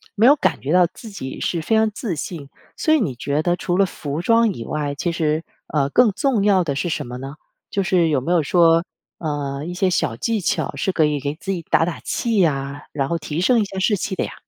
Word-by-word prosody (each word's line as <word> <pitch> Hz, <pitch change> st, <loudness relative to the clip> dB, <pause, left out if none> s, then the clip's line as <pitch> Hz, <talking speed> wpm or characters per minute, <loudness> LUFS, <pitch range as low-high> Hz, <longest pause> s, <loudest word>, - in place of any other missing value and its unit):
没 220 Hz, +2 st, +4 dB
有 285 Hz, -, +8 dB
感 -, -, 0 dB
觉 140 Hz, -, -3 dB
到 180 Hz, 0 st, +5 dB
自 225 Hz, -, -10 dB
己 130 Hz, -10 st, -7 dB
是 170 Hz, -, -1 dB
非 220 Hz, -, +1 dB
常 220 Hz, 0 st, +3 dB
自 210 Hz, -4 st, -4 dB
信。 150 Hz, -2 st, -6 dB, 0.3 s
所 315 Hz, -, +2 dB
以 315 Hz, -, +4 dB
你 145 Hz, -, -1 dB
觉 140 Hz, +5 st, -1 dB
得 175 Hz, +2 st, +1 dB
除 175 Hz, -1 st, -1 dB
了 195 Hz, -, +5 dB
服 150 Hz, -3 st, -5 dB
装 230 Hz, +2 st, +3 dB
以 115 Hz, -, -7 dB
外， 145 Hz, +2 st, -3 dB
其 170 Hz, +4 st, -1 dB
实， 160 Hz, -1 st, 0 dB, 0.2 s
呃， 140 Hz, -3 st, 0 dB
更 235 Hz, -, +4 dB
重 255 Hz, -3 st, +1 dB
要 195 Hz, -3 st, +4 dB
的 145 Hz, -4 st, -2 dB
是 140 Hz, -, -1 dB
什 165 Hz, -, -2 dB
么 125 Hz, +1 st, -6 dB
呢？ 135 Hz, +2 st, -7 dB, 0.4 s
就 200 Hz, -, 0 dB
是 180 Hz, -3 st, +2 dB
有 145 Hz, -4 st, +1 dB
没 165 Hz, -, -2 dB
有 175 Hz, -2 st, +4 dB
说， 165 Hz, +1 st, +4 dB, 0.3 s
呃， 145 Hz, -2 st, -3 dB
一 175 Hz, -, -5 dB
些 185 Hz, +1 st, +1 dB
小 145 Hz, -9 st, 0 dB
技 225 Hz, -, -1 dB
巧 185 Hz, -, -1 dB
是 190 Hz, -, 0 dB
可 160 Hz, -, +3 dB
以 150 Hz, -1 st, +1 dB
给 145 Hz, +2 st, -3 dB
自 190 Hz, +5 st, -5 dB
己 180 Hz, -3 st, -2 dB
打 165 Hz, -, +4 dB
打 170 Hz, 0 st, -3 dB
气 230 Hz, -2 st, -1 dB
呀， 140 Hz, -4 st, 0 dB
然 135 Hz, -2 st, -1 dB
后 170 Hz, -, 0 dB
提 155 Hz, +1 st, -4 dB
升 240 Hz, +5 st, +4 dB
一 210 Hz, -, +1 dB
下 195 Hz, -1 st, -6 dB
士 205 Hz, +2 st, +2 dB
气 190 Hz, -, -3 dB
的 -, -, -1 dB
呀？ -, -, -5 dB
170 Hz, 275 characters per minute, -21 LUFS, 145-195 Hz, 0.4 s, 有